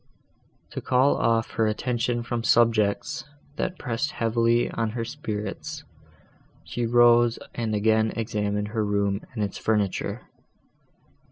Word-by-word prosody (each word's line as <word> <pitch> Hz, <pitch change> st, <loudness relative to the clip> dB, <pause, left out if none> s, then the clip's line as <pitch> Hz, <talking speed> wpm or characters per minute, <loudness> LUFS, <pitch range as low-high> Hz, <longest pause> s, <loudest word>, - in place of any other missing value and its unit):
To -, -, -5 dB
call 130 Hz, +2 st, +3 dB
off 115 Hz, 0 st, +1 dB
her 110 Hz, -, +1 dB
attention 120 Hz, +1 st, -1 dB
from 120 Hz, 0 st, -3 dB
subjects, 115 Hz, +5 st, +2 dB, 0.3 s
that 185 Hz, 0 st, -2 dB
pressed 125 Hz, +4 st, -2 dB
heavily 115 Hz, +1 st, +2 dB
on 115 Hz, -1 st, -1 dB
her 115 Hz, -, -2 dB
spirits, 120 Hz, +4 st, -5 dB, 0.8 s
she 120 Hz, -1 st, -3 dB
rose 120 Hz, 0 st, +5 dB, 0.2 s
and 110 Hz, -2 st, -2 dB
again 110 Hz, +1 st, +2 dB
examined 105 Hz, -2 st, -2 dB
her 110 Hz, 0 st, -1 dB
room 100 Hz, -1 st, 0 dB
and 110 Hz, -, -1 dB
its 100 Hz, -, -4 dB
furniture. 105 Hz, -4 st, -1 dB
115 Hz, 120 wpm, -25 LUFS, 105-120 Hz, 0.8 s, rose